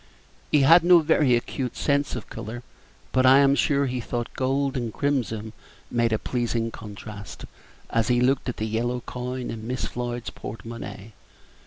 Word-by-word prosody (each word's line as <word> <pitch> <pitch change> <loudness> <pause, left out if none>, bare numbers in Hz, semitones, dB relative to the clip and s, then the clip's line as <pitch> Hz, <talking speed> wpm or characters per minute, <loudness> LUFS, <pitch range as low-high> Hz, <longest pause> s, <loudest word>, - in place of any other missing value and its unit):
He 150 - +5
had 165 +6 +7
no 175 0 +7
very 150 -5 +4
acute 125 +1 -3
sense 140 0 +1
of - - -6
color; 120 +3 -7 0.5
but 130 - +3
I 130 +1 +7
am 140 0 +5
sure 140 0 +2
that 130 - -2
he 125 -1 -2
thought 120 0 -4
gold 135 +1 0
and 120 -3 -2
crimson 110 -6 -1 0.4
made 120 -1 +2
a 110 - +2
pleasing 115 -1 -1
contrast, 105 -1 -9 0.5
as 115 -1 +1
he 120 -1 +3
looked 130 +1 +2
at 125 - -4
the 110 - -2
yellow 120 +3 -1
coin 125 +1 -5
in 110 -1 -7
Miss 125 +1 -2
Floyd's 120 -1 -4
porte 115 - -8
monnaie. 115 -2 -8
125 Hz, 175 wpm, -25 LUFS, 115-135 Hz, 0.5 s, had